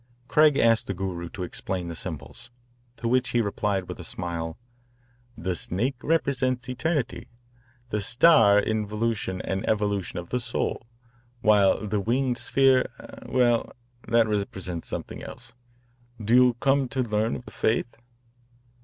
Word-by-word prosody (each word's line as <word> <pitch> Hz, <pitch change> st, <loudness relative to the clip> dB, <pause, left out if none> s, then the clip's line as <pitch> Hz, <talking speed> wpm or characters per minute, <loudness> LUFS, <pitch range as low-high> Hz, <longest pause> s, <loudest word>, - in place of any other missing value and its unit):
Craig 150 Hz, -2 st, +5 dB
asked 115 Hz, -3 st, +3 dB
the 100 Hz, -, -3 dB
Guru 90 Hz, -2 st, -4 dB
to 95 Hz, -, -6 dB
explain 90 Hz, 0 st, -4 dB
the 85 Hz, -, -5 dB
symbols, 90 Hz, -, -8 dB, 0.5 s
to 115 Hz, -, -3 dB
which 125 Hz, 0 st, +2 dB
he 120 Hz, -, +1 dB
replied 100 Hz, -3 st, -1 dB
with -, -, -7 dB
a -, -, -7 dB
smile: 85 Hz, -2 st, -4 dB, 0.8 s
"The 90 Hz, +2 st, -2 dB
snake 105 Hz, +9 st, -1 dB
represents 130 Hz, -5 st, 0 dB
eternity, 130 Hz, +1 st, -2 dB, 0.6 s
the 105 Hz, -, 0 dB
star 115 Hz, -2 st, +6 dB
involution 105 Hz, -2 st, -1 dB
and 95 Hz, 0 st, -2 dB
evolution 100 Hz, -4 st, -1 dB
of 85 Hz, -1 st, -6 dB
the 125 Hz, -, 0 dB
soul, 115 Hz, -1 st, -3 dB, 0.5 s
while 105 Hz, -1 st, +4 dB
the 105 Hz, 0 st, -1 dB
winged 125 Hz, +4 st, 0 dB
sphere 135 Hz, -1 st, +3 dB
eh, -, -, -11 dB
well, 120 Hz, -2 st, +2 dB, 0.4 s
that 115 Hz, -1 st, +4 dB
represents 95 Hz, -5 st, -3 dB
something -, -, -6 dB
else. -, -, -10 dB, 0.7 s
Do 110 Hz, +2 st, -1 dB
you 125 Hz, 0 st, +6 dB
come 135 Hz, +2 st, +2 dB
to 130 Hz, +2 st, -1 dB
learn 110 Hz, 0 st, 0 dB
of 125 Hz, -, -8 dB
the -, -, -11 dB
faith?" 115 Hz, +2 st, 0 dB
110 Hz, 145 wpm, -26 LUFS, 95-125 Hz, 0.8 s, star